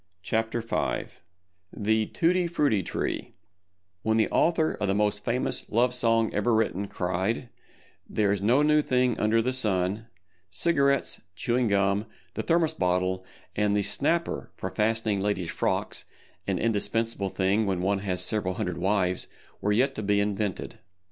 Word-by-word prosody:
THE 110 +1 0
TUTTI 175 +1 +1
FRUTTI 145 - +2
TREE - - -3 0.7
When 110 +2 +1
the 110 - +2
author 165 -2 +2
of 105 - -2
the 95 - +1
most 105 0 +1
famous 125 +1 -2
Love 120 +3 +2
Song 115 -2 +2
ever 110 +3 +2
written, 100 -2 0
cried, 95 +7 -2 0.6
"There 105 -2 +1
is 100 -1 0
no 125 +8 +4
new 150 0 +4
thing 125 -4 +1
under 110 +1 +3
the 130 +2 0
sun," 105 -3 0 0.4
cigarettes, 140 - +1
chewing 120 +3 0
gum, 100 +1 +1 0.3
the - - -2
thermos 165 -2 +2
bottle 90 +1 0 0.3
and 105 0 +2
the 100 - +1
"snapper" 145 - 0
for - - -5
fastening 110 -2 0
ladies' 95 -4 -1
frocks—(an - - -3
indispensable 115 -1 0
thing 100 +3 +1
when 90 -2 -1
one 100 +1 +1
has 95 -2 -1
several 100 -4 -1
hundred 90 -2 -3
wives)—were 95 +1 -1
yet 130 +6 +2
to 110 - -5
be 100 0 +2
invented. 100 -1 -2
105 Hz, 140 wpm, -27 LUFS, 100-120 Hz, 0.7 s, no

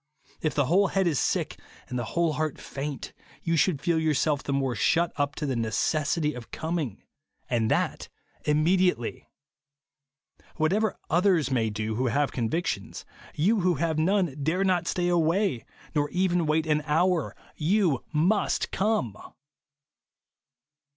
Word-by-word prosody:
If 155 - -1
the 145 - +2
whole 190 +8 +4
head 195 0 +1
is 160 -6 +1
sick - - -1 0.3
and 125 - -3
the - - -2
whole 170 -2 +3
heart 155 0 -2
faint, 140 0 -6 0.3
you 165 -1 +1
should 160 -2 +2
feel 165 +2 +1
yourself 150 -2 +1
the - - -4
more 135 -2 0
shut 165 +9 +2
up 145 -1 -1
to 150 - -3
the 135 -3 -1
necessity 150 +7 0
of 125 -2 -9
coming, 160 - -3 0.2
— - - -44
and 115 -2 +1
that - - 0 0.4
imme 155 +5 +3
diately. 180 -11 0 1.3
Whatever 195 +7 +1 0.2
others 175 -5 +3
may 115 -4 +1
do 110 +1 -3
who 130 +1 +1
have 140 +5 +1
convictions, 130 +8 -2 0.3
you 205 +8 +2
who 180 -1 +2
have 160 +1 0
none 180 -3 +1
dare 165 +7 +1
not 185 -3 +1
stay 175 -1 0
away, 170 - +1 0.3
nor 145 -2 +1
even 180 -2 +1
wait 155 +1 +2
an 150 -1 +1
hour. 170 +2 +1 0.2
Tou 170 - +2
MUST 175 +7 +1
come 190 - 0
155 Hz, 150 wpm, -27 LUFS, 140-175 Hz, 1.3 s, whole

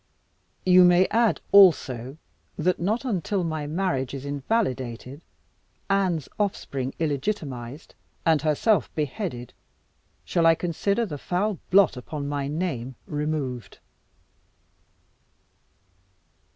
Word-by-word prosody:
You 185 0 +7
may 180 +1 +6
add, 230 0 +2
also, 140 -9 +5 0.4
that 180 0 +1
not 215 +9 -1
until 195 - -1
my 155 -3 -3
marriage 150 -6 -1
is 135 0 -7
invalidated, 140 - -2 0.7
Anne's 185 -7 +1
offspring 140 -10 -2
illegitimatised, 145 - -3 0.3
and 160 -3 +3
herself 155 - +2
beheaded, 150 - -4 0.7
shall 165 -1 +2
I 165 - +6
consider 200 +7 -1
the 150 -8 -6
foul 190 +4 -1
blot 190 -7 +5
upon 140 +3 -5
my 145 -1 -2
name 140 -6 -3
removed." 145 -7 -3
155 Hz, 100 wpm, -25 LUFS, 135-185 Hz, 0.7 s, You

